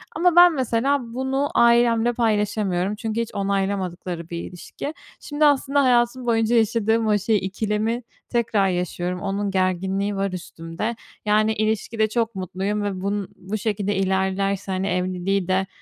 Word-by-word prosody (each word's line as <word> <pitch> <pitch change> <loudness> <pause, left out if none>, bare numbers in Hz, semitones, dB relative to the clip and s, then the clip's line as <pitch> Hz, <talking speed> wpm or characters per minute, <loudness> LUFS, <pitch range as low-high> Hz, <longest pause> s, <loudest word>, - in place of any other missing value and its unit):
Ama 345 +2 +3
ben, 350 -1 +8
mesela, 265 +1 +1
bunu 265 +2 -1
ailemle 235 0 +4
paylaşamıyorum 210 -4 0
çünkü 225 +1 -2
hiç 230 - -6
onaylamadıkları 190 -4 -2
bir 170 - -4
ilişki. 185 - -7 0.3
Şimdi, 300 0 0
aslında, 285 0 +3
hayatım 245 0 +2
boyunca 230 0 +2
yaşadığım 225 0 +2
o 210 -1 +3
şey, 215 +2 +1
ikilemi 210 +4 -2 0.3
tekrar 225 -4 +1
yaşıyorum, 180 0 -2
onun 200 0 -2
gerginliği 190 +2 0
var 195 0 -1
üstümde. 170 +4 -5 0.3
Yani, 215 +1 +3
ilişkide 220 +1 0
çok 230 -1 -1
mutluyum 190 +3 -2
ve 195 -2 -3
bunun 200 0 -2
bu 195 +4 -4
şekilde 205 -1 -1
ilerlerse, 190 +1 0
hani, 190 +1 -1
evliliği 185 0 -1
de, 190 +1 +1
205 Hz, 140 wpm, -23 LUFS, 190-230 Hz, 0.3 s, ben